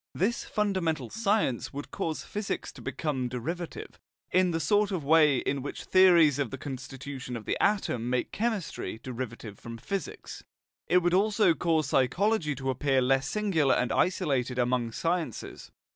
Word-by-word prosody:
This 220 Hz, +7 st, 0 dB
fundamental 190 Hz, -6 st, -1 dB
science 210 Hz, -, 0 dB
would 145 Hz, +1 st, -7 dB
cause 160 Hz, -1 st, -3 dB
physics 210 Hz, -1 st, -4 dB
to -, -, -13 dB
become 135 Hz, -6 st, -2 dB
derivative, 160 Hz, +8 st, -5 dB, 0.3 s
in 185 Hz, 0 st, +4 dB
the 165 Hz, -1 st, -1 dB
sort 205 Hz, +6 st, +2 dB
of 185 Hz, -6 st, -3 dB
way 150 Hz, -2 st, +5 dB
in 135 Hz, +2 st, -1 dB
which 140 Hz, -, -6 dB
theories 170 Hz, -7 st, +5 dB
of 140 Hz, -4 st, 0 dB
the 135 Hz, -, -6 dB
constitution 130 Hz, -1 st, -6 dB
of 110 Hz, -, -10 dB
the -, -, 0 dB
atom 125 Hz, -, +1 dB
make 125 Hz, -1 st, -1 dB
chemistry 200 Hz, -, -3 dB
derivative 115 Hz, -4 st, -6 dB
from 115 Hz, 0 st, -8 dB
physics; 195 Hz, +11 st, -5 dB, 0.4 s
it 180 Hz, 0 st, +4 dB
would 175 Hz, 0 st, +2 dB
also 200 Hz, -1 st, +4 dB
cause 160 Hz, -4 st, 0 dB
psychology 150 Hz, -, +1 dB
to 135 Hz, 0 st, -2 dB
appear 135 Hz, +1 st, +1 dB
less 135 Hz, +1 st, +2 dB
singular 180 Hz, -10 st, +2 dB
and 125 Hz, -, 0 dB
isolated 135 Hz, -9 st, +1 dB
among 125 Hz, -1 st, +1 dB
sciences. 165 Hz, -, -3 dB
150 Hz, 155 wpm, -28 LUFS, 130-185 Hz, 0.4 s, way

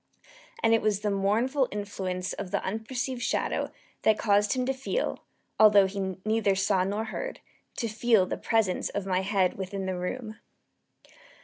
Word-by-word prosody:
And 225 Hz, -, +5 dB
it 225 Hz, -, +4 dB
was 210 Hz, -1 st, +1 dB
the 210 Hz, -1 st, 0 dB
mournful 230 Hz, +8 st, +1 dB
influence 190 Hz, -3 st, -3 dB
of 185 Hz, -, -5 dB
the 200 Hz, +1 st, -1 dB
unperceived 240 Hz, +5 st, -3 dB
shadow -, -, -1 dB, 0.3 s
that 215 Hz, -1 st, +4 dB
caused 205 Hz, -1 st, +3 dB
him 255 Hz, -1 st, -1 dB
to 270 Hz, -, 0 dB
feel 275 Hz, -, -2 dB, 0.4 s
although 205 Hz, -2 st, +7 dB
he 190 Hz, -1 st, -3 dB
neither 215 Hz, -2 st, +2 dB
saw 195 Hz, -1 st, +2 dB
nor 205 Hz, +3 st, -1 dB
heard 365 Hz, -, -5 dB, 0.4 s
to 230 Hz, -, -1 dB
feel 220 Hz, -2 st, +3 dB
the -, -, -3 dB
presence 220 Hz, -5 st, 0 dB
of 200 Hz, -1 st, -3 dB
my 185 Hz, -1 st, +1 dB
head 190 Hz, -1 st, +1 dB
within 195 Hz, 0 st, -4 dB
the 190 Hz, -1 st, -2 dB
room. 215 Hz, +5 st, -4 dB
205 Hz, 165 wpm, -28 LUFS, 195-225 Hz, 0.4 s, although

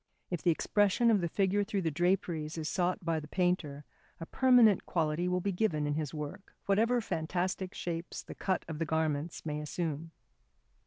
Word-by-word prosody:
If 175 Hz, -4 st, -2 dB
the 175 Hz, -, +2 dB
expression 205 Hz, +7 st, +3 dB
of 205 Hz, -4 st, +3 dB
the 170 Hz, -, -1 dB
figure 200 Hz, +3 st, +1 dB
through 200 Hz, -2 st, -2 dB
the 160 Hz, -, 0 dB
draperies 170 Hz, -2 st, 0 dB
is 155 Hz, -1 st, -3 dB
sought 180 Hz, +2 st, -1 dB
by 165 Hz, -1 st, +1 dB
the 150 Hz, -, -9 dB
painter, 155 Hz, -5 st, -1 dB, 0.3 s
a 165 Hz, -, -5 dB
permanent 245 Hz, -3 st, +5 dB
quality 165 Hz, +1 st, 0 dB
will 180 Hz, 0 st, 0 dB
be 200 Hz, -, 0 dB
given 175 Hz, -6 st, 0 dB
in 145 Hz, -, 0 dB
his 150 Hz, -2 st, -2 dB
work, 150 Hz, +6 st, -7 dB
whatever 230 Hz, +5 st, +3 dB
fantastic 180 Hz, +1 st, -2 dB
shapes 170 Hz, 0 st, -4 dB
the -, -, -9 dB
cut 190 Hz, -2 st, -1 dB
of 160 Hz, -2 st, -5 dB
the 165 Hz, -, 0 dB
garments 160 Hz, 0 st, -1 dB
may 150 Hz, -1 st, -2 dB
assume. 160 Hz, +1 st, -3 dB
175 Hz, 180 wpm, -31 LUFS, 155-195 Hz, 0.3 s, permanent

